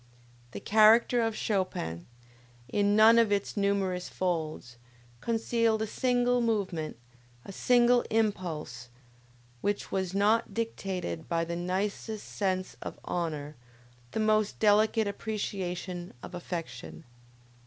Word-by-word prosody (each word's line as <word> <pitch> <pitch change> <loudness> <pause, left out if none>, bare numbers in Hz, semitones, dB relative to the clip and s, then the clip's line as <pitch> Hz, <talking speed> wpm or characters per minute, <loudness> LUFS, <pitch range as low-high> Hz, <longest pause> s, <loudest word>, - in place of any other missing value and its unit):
The 100 - -7
character 220 - +5
of 225 -1 0
Chopin, 185 - -2 0.6
in 205 +9 +2
none 225 +2 +7
of 225 -3 +3
its 200 -1 0
numerous 200 -3 0
folds, 160 -9 -3 0.4
concealed 225 - +1
a - - 0
single 245 +2 +1
movement, 195 - -1 0.5
a - - -8
single 245 +3 +4
impulse, 175 - -2 0.7
which 205 0 -2
was 190 -1 -2
not 215 +3 +2
dictated 190 - -3
by 165 0 0
the 170 +1 -4
nicest 200 +4 -3
sense 185 -2 -2
of - - -6
honor, 155 -4 -3 0.5
the 220 - -3
most 215 -1 +2
delicate 215 +1 +3
appreciation 185 - -4
of - - -9
affection. 165 - -6
200 Hz, 110 wpm, -29 LUFS, 175-220 Hz, 0.7 s, none